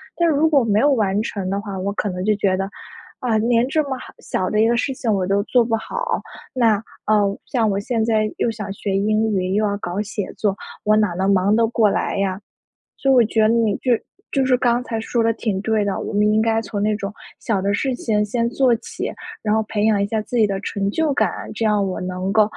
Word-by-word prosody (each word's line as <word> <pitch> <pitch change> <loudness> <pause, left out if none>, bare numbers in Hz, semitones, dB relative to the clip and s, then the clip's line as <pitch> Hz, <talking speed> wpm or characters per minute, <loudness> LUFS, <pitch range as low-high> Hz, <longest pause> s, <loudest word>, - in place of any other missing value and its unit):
但 340 - +2
是 315 - +2
如 315 +2 +3
果 280 -4 +4
没 215 -2 +2
有 285 +3 +4
完 210 -5 +1
成 200 -4 -4
的 200 +1 -1
话， 200 -2 -6
我 200 +2 -2
可 210 - -2
能 180 0 -4
就 215 0 +3
觉 195 -2 +1
得， 195 +1 -2 0.5
啊， 230 -3 +1
连 235 +2 +2
这 310 +2 +2
么 270 -2 -4
好 - - -11
小 185 - -2
的 215 - 0
一 225 - +4
个 235 - +2
事 270 +2 0
情 235 -3 -2
我 190 -2 0
都 200 +1 +2
做 245 +1 +3
不 225 -1 +1
好， 485 - -3 0.3
那 230 -4 +3 0.3
呃， 205 -2 +2
像 235 -5 0
我 200 0 0
现 225 +1 -1
在 215 -1 +1
又 235 - +1
想 210 -3 -6
学 200 -1 -3
英 215 +2 +1
语， 185 -1 0
又 215 +1 +2
要 200 -1 -1
搞 190 -1 -4
写 210 -1 -4
作， 200 -2 0 0.3
我 215 0 +4
哪 210 -2 +3
能 190 +3 +1
忙 195 +2 +3
得 230 - +4
过 225 -2 +3
来 195 - -1
呀。 195 -1 -1 0.6
所 270 - 0
以 - - +6
我 245 -3 +6
觉 220 +1 0
得 215 - +5
你 225 -3 +2
就 255 - -2
是 230 - 0 0.3
就 270 -1 +2
是 255 -1 +4
刚 240 0 +2
才 225 -3 -3
说 230 +1 0
的 230 - +3
挺 210 -4 -2
对 220 -1 +1
的， 200 -1 -1
我 - - -5
们 210 +1 +3
应 215 - +3
该 225 0 +2
从 205 -2 -4
那 215 +1 +2
种 200 0 -5 0.3
小 205 -4 0
的 200 +1 +1
事 265 +4 0
情 210 -3 0
先 235 +2 0
做 250 -1 +3
起， 230 - -5 0.3
然 210 - 0
后 220 - +2
培 210 0 -1
养 210 -2 +3
一 200 - +1
下 220 +1 -1
自 240 +3 -5
己 220 - +5
的 195 -1 -3
成 200 -1 -2
就 310 +5 0
感， - - +2 0.3
这 230 - -2
样 210 -2 +2
我 185 - -3
能 185 +1 -3
够， 215 0 +5
215 Hz, 275 characters per minute, -21 LUFS, 200-235 Hz, 0.6 s, 以